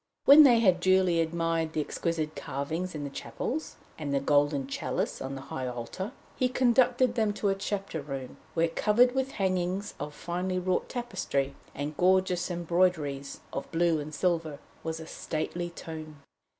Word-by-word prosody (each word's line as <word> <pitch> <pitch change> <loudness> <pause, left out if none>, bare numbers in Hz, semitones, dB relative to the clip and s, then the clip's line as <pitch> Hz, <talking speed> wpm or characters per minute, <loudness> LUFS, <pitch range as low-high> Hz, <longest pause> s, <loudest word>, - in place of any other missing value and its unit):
When 285 +3 +10
they 245 -6 +7
had 185 -5 +4
duly 185 -1 +3
admired 165 -1 0
the - - -1
exquisite 155 0 -2
carvings 160 +6 -3
in 150 - -4
the 140 - -5
chapels, 300 - -4 0.2
and 145 -2 -3
the 140 - +2
golden 145 0 +2
chalice 130 -1 -2
on 135 +1 -4
the 135 - -6
High 130 -1 -4
Altar, 125 - -5 0.2
he 255 - +1
conducted 250 0 +3
them 220 -3 +1
to 205 0 0
a - - +3
chapter 195 -4 -3
room, 135 -2 -6 0.2
where, 165 0 +3
covered 230 +8 +3
with 265 0 -1
hangings 190 +1 -1
of 150 - -5
finely 180 +2 -2
wrought 185 0 0
tapestry, 190 - -2 0.2
and 145 +2 -4
gorgeous 185 -1 +3
embroideries 170 -5 0
of - - -5
blue 165 -1 +2
and 150 +1 -6
silver, 165 -2 0 0.3
was 160 0 -3
a 160 - -7
stately 175 +3 -3
tomb. 155 -3 -9
170 Hz, 165 wpm, -29 LUFS, 150-190 Hz, 0.3 s, When